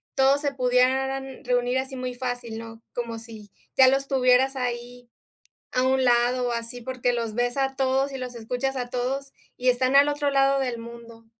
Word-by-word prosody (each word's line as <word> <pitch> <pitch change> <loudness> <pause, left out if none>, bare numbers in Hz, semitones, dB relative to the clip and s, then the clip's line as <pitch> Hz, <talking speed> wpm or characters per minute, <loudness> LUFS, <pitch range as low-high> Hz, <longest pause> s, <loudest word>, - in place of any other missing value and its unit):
todos 275 +2 +4
se 285 -1 -1
pudieran 265 +1 +1
reunir 245 +1 +1
así 265 0 -5
muy 255 -1 -4
fácil, 245 -2 -4
¿no? 225 0 -10
Como 235 -2 -4
si 220 -3 -11 0.2
ya 260 -1 +7
los 270 +1 +2
tuvieras 260 0 +3
ahí 245 -1 -5 0.6
a 255 - +1
un 260 0 +2
lado 245 +1 +3
o - - -1
así, 235 +1 -4
porque 250 0 -1
los 230 -2 -2
ves 245 +3 -1
a 270 0 0
todos 270 +1 +1
y - - -4
los 250 -1 -6
escuchas 250 +4 -3
a 245 -1 -3
todos, 270 +2 -3 0.2
y 250 0 +2
están 255 +2 +2
al 285 +1 +7
otro 290 0 0
lado 275 0 +3
del 250 -3 -2
mundo. 230 0 -11
250 Hz, 190 wpm, -25 LUFS, 240-270 Hz, 0.6 s, ya